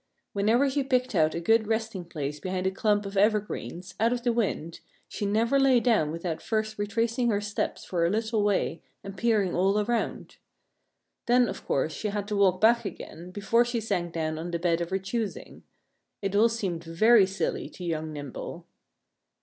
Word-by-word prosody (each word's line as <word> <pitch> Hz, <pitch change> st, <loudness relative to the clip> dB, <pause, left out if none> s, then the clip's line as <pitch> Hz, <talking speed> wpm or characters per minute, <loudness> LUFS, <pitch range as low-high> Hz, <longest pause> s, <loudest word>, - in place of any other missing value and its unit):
Whenever 225 Hz, +7 st, +3 dB
she 280 Hz, +1 st, 0 dB
picked 255 Hz, -2 st, 0 dB
out 155 Hz, -4 st, +2 dB
a -, -, -1 dB
good 220 Hz, +5 st, +3 dB
resting 220 Hz, -4 st, -2 dB
place 150 Hz, -3 st, -5 dB
behind 185 Hz, +2 st, -3 dB
a 190 Hz, -, +2 dB
clump 205 Hz, +1 st, +1 dB
of 195 Hz, +1 st, -6 dB
evergreens, 200 Hz, -3 st, 0 dB
out 225 Hz, +2 st, +3 dB
of 245 Hz, -1 st, -2 dB
the 240 Hz, -1 st, +2 dB
wind, 180 Hz, -8 st, -2 dB, 0.3 s
she 205 Hz, -, -3 dB
never 230 Hz, +6 st, +2 dB
lay 265 Hz, -2 st, +5 dB
down 225 Hz, -11 st, +2 dB
without 165 Hz, 0 st, -4 dB
first 215 Hz, -1 st, -2 dB
retracing 230 Hz, +4 st, 0 dB
her 205 Hz, -2 st, +1 dB
steps 205 Hz, 0 st, -3 dB
for 175 Hz, -2 st, -1 dB
a 170 Hz, -, +3 dB
little 220 Hz, +1 st, 0 dB
way 200 Hz, -5 st, 0 dB, 0.2 s
and 195 Hz, 0 st, -8 dB
peering 210 Hz, -3 st, +1 dB
all 195 Hz, +3 st, +2 dB
around. 230 Hz, +3 st, -2 dB, 0.9 s
Then, 245 Hz, 0 st, +4 dB
of -, -, -6 dB
course, 150 Hz, +3 st, 0 dB
she 215 Hz, -, -3 dB
had 205 Hz, -1 st, -3 dB
to 210 Hz, -, -1 dB
walk 190 Hz, -2 st, +3 dB
back 235 Hz, +3 st, +4 dB
again 180 Hz, -3 st, -8 dB
before 210 Hz, +5 st, +2 dB
she 240 Hz, -1 st, -2 dB
sank 195 Hz, -6 st, -2 dB
down 155 Hz, -1 st, -2 dB
on 170 Hz, +2 st, -5 dB
the 170 Hz, -, -1 dB
bed 170 Hz, 0 st, +1 dB
of 170 Hz, -, -3 dB
her 190 Hz, -, 0 dB
choosing. 200 Hz, +3 st, -4 dB, 0.6 s
It 200 Hz, 0 st, -2 dB
all 225 Hz, +3 st, +5 dB
seemed 190 Hz, -7 st, -3 dB
very 195 Hz, +5 st, +5 dB
silly 195 Hz, 0 st, -2 dB
to 180 Hz, -, -11 dB
young 160 Hz, -2 st, -2 dB
Nimble. 145 Hz, -3 st, -7 dB
205 Hz, 190 wpm, -27 LUFS, 175-225 Hz, 0.9 s, lay